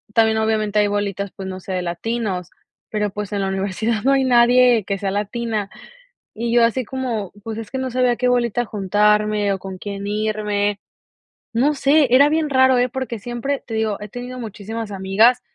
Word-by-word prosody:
también 220 -1 +4
obviamente 215 -1 +1
hay 205 - +3
bolitas, 200 -1 -2
pues, 190 - -6
no 185 0 -6
sé, 190 - -8
de 185 - -1
latinos, 185 0 -3 0.4
pero 210 -2 -1
pues, 205 0 -5
en 200 -1 -1
la 195 - 0
universidad 200 +3 -1
no 270 - +3
hay 270 -1 +3
nadie 245 -2 +5
que 200 0 -2
sea 195 0 -2
latina, 210 0 -2 0.6
y 230 +1 -3
yo 240 -1 +5
así 245 +3 0
como: 235 -6 -3
"pues, 220 0 -5
es 220 -2 -7
que 265 - -3
no 260 -1 -3
sabía 250 0 +2
a - - -4
qué 250 - +1
bolita 240 -1 +1
juntarme 210 0 +2
o 195 - -4
con 190 0 -7
quién 200 0 -5
irme", 210 -1 -1 0.8
no 275 +6 +2
sé, 285 +1 +3
era 280 +3 +7
bien 310 -1 0
raro, 260 -1 +5
eh, 245 +1 +2
porque 260 -2 -4
siempre, 245 +5 -3
te 225 - -6
digo, 220 -2 0
he 210 - -7
tenido 245 +3 -7
muchísimas 220 0 -6
amigas 200 +6 +3
220 Hz, 195 wpm, -20 LUFS, 205-245 Hz, 0.8 s, era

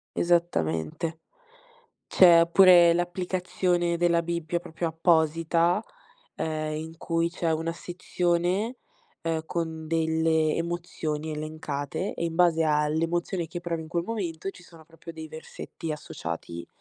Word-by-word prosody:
Esattamente. 160 - 0 0.9
C'è 170 -2 +7
pure 175 -2 +8
l'applicazione 175 0 0
della 170 -1 +2
Bibbia 170 0 -2
proprio 165 0 -4
apposita, 165 +3 +2 0.5
ehm, 155 -1 -2
in 160 +1 -7
cui 165 0 0
c'è 170 -1 -2
una 165 +1 -1
sezione, 180 +5 -1 0.5
ehm, 160 -1 -1
con 160 -2 -3
delle 160 -1 +2
emozioni 165 -2 -3
elencate, 155 +2 -4
e 170 - -3
in 165 -1 -2
base 165 -2 +4
all'emozione 165 +4 0
che 175 +2 -6
provi 170 -2 -3
in 160 - -11
quel 170 0 -1
momento, 195 -5 -3
ci 180 - -16
sono 165 -2 -16
proprio 165 +1 -12
dei 160 -1 -8
versetti 160 +1 -8
associati 85 - -6
165 Hz, 120 wpm, -27 LUFS, 160-175 Hz, 0.9 s, pure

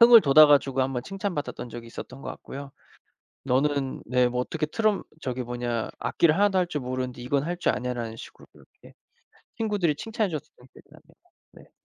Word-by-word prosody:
흥을 235 -1 +10
돋아 150 +1 +8
가지고 135 -2 +3
1 135 +1 -1
번 125 -1 -2
칭찬받았던 190 - -4
적이 120 0 -8
있었던 130 +3 -9
것 - - -7
같고요. 140 0 -9 0.7
"너는" 135 +1 0
네 125 +1 +3
뭐 125 0 -1
"어떻게 155 +3 -2
트럼 215 +4 +1 0.2
저기 130 -1 -2
뭐냐 120 -1 -3
악기를 160 -2 +2
하나도 200 -1 +3
할 180 - +2
줄 150 -5 -3
모르는데 125 -1 -4
이건 135 +2 0
할 175 +1 -2
줄 - - +1
아냐."라는 120 -3 -4
식으로 - - -12
그렇게 - - -19 0.6
친구들이 205 -8 +1
칭찬해 220 +4 -2
줬었던 145 -5 -8
기억이 - - -18
나네요. - - -19 0.4
네. - - -17
140 Hz, 395 characters per minute, -26 LUFS, 125-175 Hz, 0.7 s, 흥을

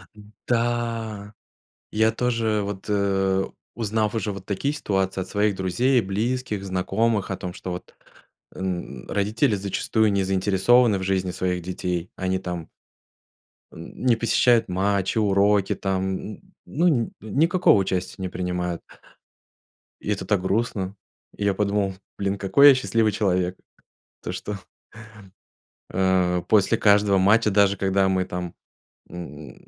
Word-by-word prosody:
М, 105 0 -16
да! 115 -3 -1 0.6
Я 110 +1 +3
тоже, 115 -2 0
вот, 100 -1 -6
э, 95 -2 +1 0.3
узнав 110 -1 -1
уже 105 -1 -1
вот 95 -1 -8
такие 110 +9 -1
ситуации 95 -9 -1
от - - -6
своих 105 -1 +1
друзей, 120 +8 +2
близких, 110 +1 -2
знакомых, 100 +2 0
о 95 - -2
том, 90 -2 -6
что 90 - -6
вот 90 - -8 0.6
э, - - -12
н 90 -8 -5
родители 105 +2 +1
зачастую 100 +2 0
не 100 - +1
заинтересованы 100 +4 +3
в - - -6
жизни 95 -1 0
своих 90 0 -2
детей, 90 -1 -3
они 95 0 -1
там 90 -3 -5 1.1
м, 80 - -10
не 120 -2 +5
посещают 115 +1 +3
матчи, 95 +2 0
уроки, 100 -1 +3
там, 95 -1 -1
н 105 - -8 0.2
ну, 170 +4 +1
нь 120 -8 +1
никакого 160 - +3
участия 95 -1 -2
не 95 - -2
принимают. 90 -1 -3 1.2
И - - -6
это 95 -2 -2
так 100 -1 +1
грустно. 100 -1 -1 0.4
И 105 - -3
я 100 - +3
подумал: 100 -1 0 0.2
"Блин, 100 0 -1
какой 140 +9 +6
я 135 - +7
счастливый 115 -4 +1
человек!" 90 -3 0 0.7
То - - -4
что 105 -1 -5 1.3
Э. 90 -1 +1
После 110 +1 +3
каждого 100 -2 +4
матча, 105 +3 +4
даже 100 0 +3
когда 95 0 +2
мы 95 -1 +1
там, 90 -1 -5 0.6
м, 80 -4 -9
100 Hz, 135 wpm, -24 LUFS, 95-110 Hz, 1.3 s, я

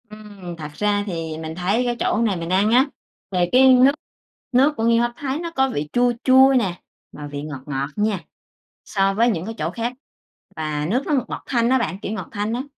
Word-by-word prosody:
Ừm, 205 -5 -10
thật 150 -2 -7
ra 205 +3 0
thì 165 -4 -4
mình 160 0 -6
thấy 195 +7 0
cái 240 0 0
chỗ - - +1
này 215 -4 +1
mình 165 0 -5
ăn 195 +4 +2
á, 255 +3 +5 0.5
về 180 -2 +1
cái 260 +1 +7
nước 255 +2 +6 0.6
nước 270 +4 +4
của 225 - -1
nghêu 230 0 +4
hấp 240 0 0
Thái 275 +2 -3
nó 335 0 -5
có 265 -4 +1
vị 150 - -3
chua 245 0 +3
chua 265 +1 +6
nè, 185 -6 -3 0.3
mà 145 -1 -8
vị 145 0 -6
ngọt 145 -3 -7
ngọt 140 -1 -3
nha 210 -2 0 0.7
so 195 -1 +1
với 230 +4 +3
những 180 -6 -2
cái 225 - -5
chỗ - - -2
khác. 235 +1 -3 0.6
Và 150 -1 -2
nước 250 +7 0
nó 305 - 0
ngọt 265 -4 +1
ngọt - - -6
thanh 235 -2 +1
á 260 - +4
bạn, 215 -6 -2
kiểu, - - -4
ngọt 220 - -5
thanh 210 +1 -2
á. 250 +2 -2
210 Hz, 230 wpm, -22 LUFS, 175-245 Hz, 0.7 s, cái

